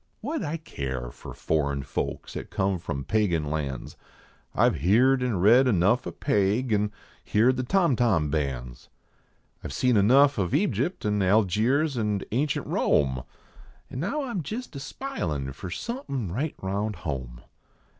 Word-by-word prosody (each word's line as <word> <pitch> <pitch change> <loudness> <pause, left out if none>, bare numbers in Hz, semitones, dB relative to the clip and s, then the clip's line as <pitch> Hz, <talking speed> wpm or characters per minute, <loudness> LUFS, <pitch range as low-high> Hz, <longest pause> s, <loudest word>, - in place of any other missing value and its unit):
What 300 +8 -2
d - - -3
I 155 +2 -2
care 65 - -5
for - - -10
foreign 70 -3 0
folks 70 - -4
at - - -6
come 95 -1 0
from 70 -5 -4
pagan 85 -8 0
lands? 70 -4 -4 0.6
I - - +5
ve - - -4
heerd 125 - +4
an 125 -5 0
read 120 +8 +6
enough 100 +2 +2
of - - -8
Paig, 110 0 +1
an 105 0 +1 0.4
heard 120 +5 +4
the 130 - -1
torn 170 +1 +2
torn 95 -12 +2
bands. 65 -5 -3 0.7
I - - -4
ve - - -7
seen 125 +2 +3
enough 135 +6 +5
of 90 -3 0
Egypt, 190 - 0
n 105 -1 +1
Algiers, 110 - +2
nd 105 -3 -1
ancient 140 +6 0
Rome, 65 -3 +1 0.7
An 130 - -5
now 280 - -1
I 260 - -4
m 195 - -2
jist 220 - -6
a - - -4
spilin 80 - -4
for 90 +6 -7
somepiif 140 - -4
right 145 +8 -2
round 100 +2 -2
home. 65 -5 -4
105 Hz, 165 wpm, -26 LUFS, -, 0.7 s, read